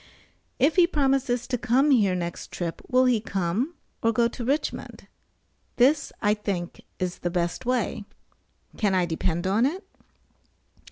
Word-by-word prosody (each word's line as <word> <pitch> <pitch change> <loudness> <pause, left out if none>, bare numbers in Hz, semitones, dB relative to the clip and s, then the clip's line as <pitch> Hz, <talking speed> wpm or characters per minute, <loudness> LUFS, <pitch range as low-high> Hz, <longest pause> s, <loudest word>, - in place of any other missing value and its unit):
If 305 +7 +2
he 350 -1 +7
promises 270 -6 +1
to 250 -2 -2
come 255 +5 +3
here 205 -8 +4
next 170 -1 -5
trip, 170 -2 -4
will 255 0 +4
he 245 -4 +3
come, 200 - -2 0.3
or 230 - +3
go 235 +1 +3
to 240 - -7
Richmond? 280 +6 -3 0.7
This 280 +5 +3
I 205 -1 +4
think 195 -5 -4 0.2
is 180 -1 -3
the 175 - -2
best 175 +6 -2
way. 240 -4 -1 0.7
Can 205 -4 +1
I 180 -1 +3
depend 170 +1 -2
on 200 +5 +2
it? 365 +7 -5
230 Hz, 150 wpm, -25 LUFS, 185-260 Hz, 0.7 s, he